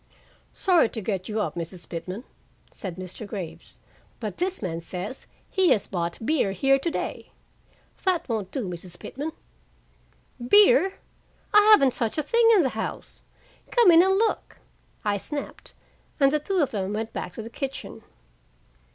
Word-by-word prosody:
"Sorry 355 - +3
to - - -4
get 195 -2 -3
you 215 +1 -1
up, - - -2
Mrs. 170 0 -7
Pitman," 185 +6 -6 0.5
said 185 -4 -7
Mr. 185 +3 -7
Graves, 190 -6 -8 0.4
"but - - -5
this 365 +1 -1
man 170 -4 -4
says 180 +9 -6 0.2
he 380 -3 +2
has 205 - +3
bought 170 -2 -3
beer 270 -10 +1
here 270 +7 +3
to 305 - -1
day. - - -5 0.7
That 370 -3 +1
won't 220 -6 -2
do, 235 -2 -3
Mrs. 175 0 -6
Pitman." 295 +4 -5 1.1
"Beer! 400 - +5 0.6
I 420 0 +7
haven't 275 - +6
such 230 +2 -1
a 305 - +1
thing 465 +9 +4
in 375 - +5
the 265 - +1
house. 220 -1 -6 0.5
Come 470 -7 +6
in 330 0 +8
and 385 +1 +3
look," 445 +1 -1 0.5
I 205 -1 +1
snapped. 285 +8 -6 0.4
And 275 -1 +5
the 300 - +2
two 380 +6 -2
of 295 -6 +2
them 200 -1 -2
went 220 +1 -3
back 180 - -5
to 225 - -6
the 230 - -9
kitchen. 275 +1 -6
235 Hz, 160 wpm, -25 LUFS, -, 1.1 s, in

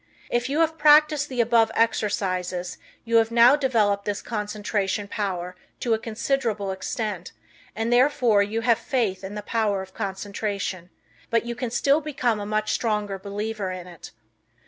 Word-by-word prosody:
If 240 +1 0
you 295 +4 +1
have 325 0 +1
practiced 300 0 +5
the 250 -2 +1
above 230 -1 +3
exercises 185 -5 -1 0.3
you 230 0 +3
have 225 0 +3
now 235 +3 +6
developed 220 -8 +1
this 205 -1 -3
concentration 210 -2 -2
power 185 -4 -3 0.2
to 235 - 0
a 220 - +1
considerable 225 -3 -2
extent 190 -1 -4 0.4
and 225 +2 0
therefore 245 -4 +4
you 215 +3 -1
have 230 -1 +3
faith 210 -8 -1
in 195 +2 -6
the 210 - -5
power 210 -3 0
of 190 0 -14
concentration, 200 -2 -4 0.4
but 230 0 +1
you 240 - -3
can 250 0 -4
still 280 +5 +2
become 255 -7 -1
a 205 - -5
much 215 0 0
stronger 210 -4 -1
believer 205 0 -4
in 185 -1 -6
it. 175 -2 -11
215 Hz, 160 wpm, -24 LUFS, 200-240 Hz, 0.4 s, now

